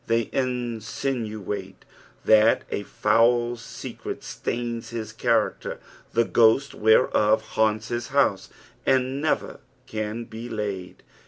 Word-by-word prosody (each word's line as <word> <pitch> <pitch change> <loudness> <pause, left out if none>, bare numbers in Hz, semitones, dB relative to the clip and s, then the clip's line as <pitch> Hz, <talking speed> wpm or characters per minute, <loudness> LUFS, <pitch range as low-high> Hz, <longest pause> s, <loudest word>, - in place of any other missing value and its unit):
They 115 -1 +1
insinuate 115 -5 -3 0.4
that 110 +1 +5
a - - -1
foul 120 +4 +2
secret 115 - -7
stains 115 -1 -4
his 115 -2 -5
character, - - 0 0.3
the 115 0 +3
gliost 120 +6 +4
whereof 110 0 +4
liannts 110 0 +1
his 120 -1 -2
house, - - +1 0.3
and 130 +1 +1
never 155 - -1 0.3
can 110 +1 -4
be 115 +1 -8
laid. 100 -5 -5
115 Hz, 105 wpm, -25 LUFS, 110-120 Hz, 0.4 s, that